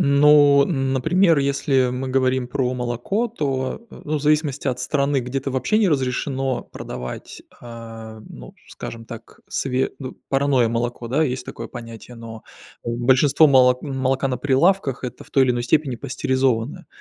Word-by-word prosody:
Ну, 145 Hz, -1 st, +6 dB
например, 160 Hz, +4 st, +2 dB
если 140 Hz, -2 st, +1 dB
мы 130 Hz, +1 st, -4 dB
говорим 130 Hz, -1 st, +1 dB
про 125 Hz, 0 st, -1 dB
молоко, 125 Hz, -, -2 dB
то, 135 Hz, -, -3 dB
ну, 150 Hz, 0 st, -4 dB
в -, -, -8 dB
зависимости 150 Hz, -2 st, +1 dB
от 125 Hz, -1 st, -2 dB
страны. 140 Hz, +1 st, 0 dB
Где-то 135 Hz, +3 st, -3 dB
вообще 130 Hz, -, 0 dB
не 210 Hz, -, +3 dB
разрешено 135 Hz, -2 st, -1 dB
продавать, 60 Hz, 0 st, -8 dB, 0.2 s
э, 115 Hz, -2 st, -10 dB
ну -, -, -12 dB
скажем 115 Hz, 0 st, -8 dB
так, 115 Hz, -1 st, -11 dB
све 130 Hz, 0 st, -1 dB
ну, 130 Hz, -2 st, -7 dB
парное 135 Hz, -4 st, +2 dB
молоко. 120 Hz, 0 st, -3 dB
Да, 150 Hz, +6 st, +2 dB
есть 125 Hz, -2 st, -3 dB
такое -, -, -7 dB
понятие. 115 Hz, 0 st, -10 dB
Но, 115 Hz, -1 st, -10 dB, 0.4 s
большинство 130 Hz, +6 st, +3 dB
моло 125 Hz, -2 st, +5 dB
молока 135 Hz, -1 st, -1 dB
на 125 Hz, -, -1 dB
прилавках- 140 Hz, +2 st, +1 dB
это 125 Hz, 0 st, -7 dB
в -, -, -21 dB
той 135 Hz, -, +4 dB
или 130 Hz, -, +2 dB
иной 120 Hz, -1 st, -1 dB
степени 135 Hz, -1 st, +1 dB
пастеризованное. 130 Hz, +3 st, -1 dB
130 Hz, 150 wpm, -22 LUFS, 125-140 Hz, 0.4 s, Ну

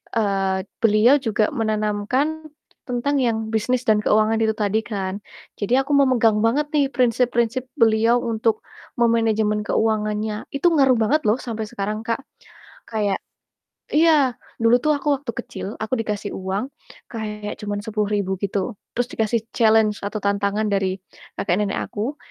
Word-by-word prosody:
eee, 195 Hz, -3 st, 0 dB, 0.2 s
beliau 225 Hz, +4 st, +5 dB
juga 220 Hz, -4 st, 0 dB
menanamkan 225 Hz, +7 st, -1 dB, 0.4 s
tentang 250 Hz, +3 st, -1 dB
yang 235 Hz, -4 st, +1 dB
bisnis 235 Hz, +3 st, 0 dB
dan 215 Hz, -2 st, +3 dB
keuangan 215 Hz, +1 st, +2 dB
itu 220 Hz, -1 st, +1 dB
tadi, 210 Hz, 0 st, +1 dB
kan. 195 Hz, -2 st, -3 dB, 0.4 s
Jadi 205 Hz, +3 st, -1 dB
aku 275 Hz, -, -6 dB
memegang 235 Hz, -6 st, +3 dB
banget 280 Hz, +8 st, +1 dB
nih, 285 Hz, -2 st, +3 dB
prinsip-prinsip 245 Hz, 0 st, +1 dB
beliau 230 Hz, +1 st, +3 dB
untuk 225 Hz, -1 st, 0 dB, 0.4 s
memenejemen 220 Hz, -2 st, +2 dB
keuangannya. 215 Hz, -1 st, -1 dB
Itu 345 Hz, +5 st, +3 dB
ngaruh 270 Hz, -5 st, +4 dB
banget 275 Hz, +8 st, +2 dB
loh 210 Hz, -, +4 dB
sampe 225 Hz, -3 st, -4 dB
sekarang, 210 Hz, +2 st, -4 dB
Kak, 235 Hz, +4 st, -1 dB, 0.7 s
kayak 210 Hz, -3 st, 0 dB, 0.8 s
iya, 300 Hz, -4 st, +4 dB, 0.3 s
dulu 235 Hz, +2 st, +5 dB
tuh 305 Hz, +3 st, +2 dB
aku 285 Hz, +1 st, -4 dB
waktu 270 Hz, -3 st, -3 dB
kecil, 245 Hz, -, -7 dB, 0.2 s
aku 220 Hz, -, -5 dB
dikasih 210 Hz, -2 st, -3 dB
uang 190 Hz, +3 st, -3 dB, 0.5 s
kayak 210 Hz, -2 st, -5 dB
cuman 205 Hz, -1 st, -4 dB
Rp10.000 205 Hz, -3 st, -1 dB
gitu, 200 Hz, +2 st, -2 dB, 0.2 s
terus 245 Hz, -, +2 dB
dikasih 220 Hz, 0 st, 0 dB
challenge 220 Hz, -2 st, +3 dB
atau 205 Hz, +2 st, -4 dB
tantangan 200 Hz, +1 st, 0 dB
dari 190 Hz, -1 st, 0 dB, 0.4 s
kakek-nenek 200 Hz, +2 st, 0 dB
aku, 230 Hz, +8 st, -4 dB
220 Hz, 135 wpm, -22 LUFS, 210-245 Hz, 0.8 s, beliau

